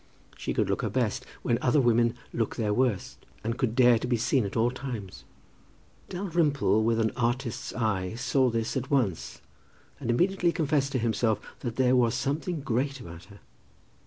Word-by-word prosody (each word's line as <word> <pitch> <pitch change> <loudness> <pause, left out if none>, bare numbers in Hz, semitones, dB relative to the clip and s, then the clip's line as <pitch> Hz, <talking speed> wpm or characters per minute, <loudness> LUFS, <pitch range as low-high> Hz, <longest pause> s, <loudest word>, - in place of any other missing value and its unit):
She - - -4
could - - +1
look - - 0
her - - -1
best 125 0 -1 0.2
when 120 -1 +1
other 130 +4 +3
women 120 -1 +3 0.2
look 115 -2 -1
their 105 -2 0
worst, 120 -5 -1 0.2
and 115 +2 -1
could 120 -3 -1
dare 120 -2 +6
to 125 - -4
be 120 -1 +1
seen 125 +1 +1
at 100 - -4
all 115 +2 +3
times. 110 - -7 0.8
Dalrymple, 165 - +1
with 115 0 +2
an 110 -2 +2
artist's 120 -1 -2
eye, 110 -4 -1
saw 130 +1 +2
this 115 +1 -2
at 130 0 -2
once, 120 - -1 0.6
and - - -5
immediately 175 +7 +2
confessed 145 -4 0
to - - +2
himself 115 -1 +1 0.2
that 120 -3 -4
there 130 0 +3
was 120 -1 +3
something 155 +5 -2
great 135 +2 -1
about 85 -7 -10
her. 100 -1 -16
120 Hz, 175 wpm, -28 LUFS, 115-135 Hz, 0.8 s, dare